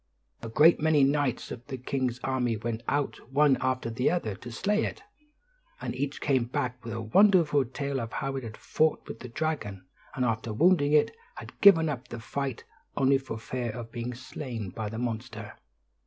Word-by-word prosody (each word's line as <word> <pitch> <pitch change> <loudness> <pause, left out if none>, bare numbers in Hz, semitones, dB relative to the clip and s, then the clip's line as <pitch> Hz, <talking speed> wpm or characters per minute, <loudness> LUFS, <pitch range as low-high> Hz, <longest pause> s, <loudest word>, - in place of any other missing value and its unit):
A 115 - -6
great 155 +8 +6
many 155 -2 +4
knights 140 -2 +1
of 120 - -7
the 135 -2 -5
king's 125 -1 -2
army 125 -4 0
went 115 +1 -3
out 145 -1 0
one 145 0 +5
after 130 -2 -1
the 125 +3 +1
other 170 - -1
to 115 +5 -9
slay 210 - +1
it, 420 - -4 0.8
and - - -4
each 140 +2 -3
came 130 -4 +2
back 125 -1 -3
with 115 -1 -5
a 115 - -3
wonderful 155 - +4
tale 140 +2 -3
of 115 - -6
how 135 0 -2
he 135 -1 -4
had 110 -2 -8
fought 155 0 0
with - - -7
the 125 - -8
dragon; 115 -10 -3 0.3
and, 125 - +1
after 115 -1 -1
wounding 150 - +4
it, 150 - +4 0.2
had - - -11
given 170 -6 +8
up 130 -4 -4
the 120 - -7
fight 135 +2 -4 0.3
only 135 0 +4
for 130 -4 -6
fear 120 +2 -4
of 115 0 -7
being 120 0 -4
slain 120 -5 -6
by 110 +2 -4
the 110 - -6
monster. 115 -2 -4
130 Hz, 190 wpm, -28 LUFS, 115-145 Hz, 0.8 s, given